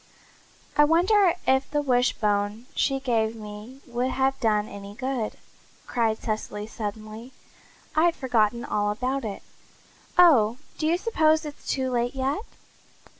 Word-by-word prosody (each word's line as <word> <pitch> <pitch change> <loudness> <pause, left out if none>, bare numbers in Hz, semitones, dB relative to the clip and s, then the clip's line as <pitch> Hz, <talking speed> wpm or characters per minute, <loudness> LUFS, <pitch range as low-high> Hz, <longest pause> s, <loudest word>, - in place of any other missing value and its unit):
"I 295 - +6
wonder 355 +4 +4
if 265 +1 +2
the 295 0 0
wishbone 220 -4 +1
she 270 -1 +1
gave 230 -4 0
me 215 +4 -10
would 245 +1 -1
have 265 +1 0
done 210 -2 +1
any 200 -1 -9
good," 255 -2 -3 0.5
cried 225 -3 0
Cecily 215 -2 -4
suddenly. 215 +3 -7 0.6
"I'd 330 +2 +4
forgotten 235 -3 +1
all 205 0 0
about 255 +5 -2
it. 210 -3 -5 0.7
Oh, 250 -11 +6 0.2
do 310 - +1
you 335 +2 +3
suppose 315 -7 +2
it's 295 -1 -9
too 260 -1 0
late 245 +1 0
yet?" 270 +7 -1
245 Hz, 130 wpm, -26 LUFS, 215-275 Hz, 0.7 s, I